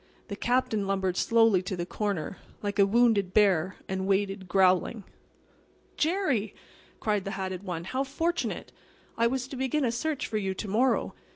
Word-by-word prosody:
The 200 Hz, -, -3 dB
Captain 240 Hz, -3 st, 0 dB
lumbered 190 Hz, -2 st, 0 dB
slowly 225 Hz, -3 st, +4 dB
to 185 Hz, +1 st, -4 dB
the 175 Hz, -, -2 dB
corner, 195 Hz, -3 st, -3 dB, 0.3 s
like 205 Hz, 0 st, -2 dB
a 200 Hz, -, +6 dB
wounded 210 Hz, -4 st, +3 dB
bear, 185 Hz, -4 st, +3 dB
and 190 Hz, 0 st, -2 dB
waited, 195 Hz, -1 st, 0 dB
growling. 190 Hz, +3 st, +2 dB, 0.9 s
"Jerry!" 300 Hz, -, 0 dB, 0.4 s
cried 210 Hz, -3 st, 0 dB
the 195 Hz, -, -4 dB
hatted 190 Hz, -1 st, -3 dB
one. 175 Hz, -4 st, -4 dB
"How 260 Hz, +9 st, -1 dB
fortunate! 330 Hz, +5 st, -2 dB, 0.4 s
I 230 Hz, 0 st, +3 dB
was 255 Hz, +1 st, -2 dB
to 275 Hz, -, -6 dB
begin 265 Hz, +2 st, 0 dB
a 235 Hz, -, +1 dB
search 285 Hz, +4 st, -2 dB
for 220 Hz, -, -2 dB
you 190 Hz, -2 st, -2 dB
to 210 Hz, -, -5 dB
morrow. 235 Hz, +7 st, +1 dB
205 Hz, 165 wpm, -28 LUFS, 190-245 Hz, 0.9 s, a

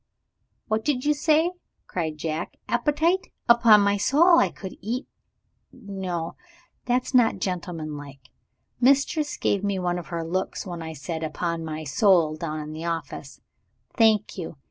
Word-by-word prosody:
"What 220 Hz, 0 st, 0 dB
did 280 Hz, -3 st, 0 dB
you 300 Hz, -, +4 dB
say?" 310 Hz, +3 st, +2 dB, 0.3 s
cried 160 Hz, -4 st, -3 dB
Jack. 160 Hz, +2 st, -4 dB
"Appetite! 305 Hz, +9 st, +1 dB, 0.2 s
Upon 235 Hz, -3 st, +7 dB
my 200 Hz, 0 st, +2 dB
soul, 325 Hz, -, +5 dB
I -, -, +3 dB
could 190 Hz, -2 st, -9 dB
eat 235 Hz, +7 st, -3 dB, 0.6 s
No, 190 Hz, -8 st, -5 dB, 0.5 s
that's 250 Hz, +2 st, 0 dB
not 245 Hz, -3 st, +4 dB
gentleman 170 Hz, -4 st, -4 dB
like. 140 Hz, -3 st, -12 dB, 0.5 s
Mistress 280 Hz, +4 st, +2 dB
gave 200 Hz, -1 st, 0 dB
me 200 Hz, -1 st, 0 dB
one 180 Hz, -1 st, -1 dB
of 170 Hz, -, -10 dB
her 170 Hz, -1 st, -4 dB
looks 185 Hz, +5 st, -3 dB
when 175 Hz, -3 st, -6 dB
I 160 Hz, 0 st, -6 dB
said 160 Hz, +2 st, -5 dB
'Upon 165 Hz, +1 st, -3 dB
my 155 Hz, 0 st, -5 dB
soul' 160 Hz, +1 st, +3 dB
down 155 Hz, -1 st, -4 dB
in 150 Hz, 0 st, -6 dB
the 160 Hz, +1 st, -6 dB
office. 165 Hz, -4 st, -5 dB, 0.5 s
Thank 215 Hz, -4 st, +3 dB
you. 165 Hz, -3 st, -6 dB
185 Hz, 150 wpm, -25 LUFS, 160-240 Hz, 0.6 s, Upon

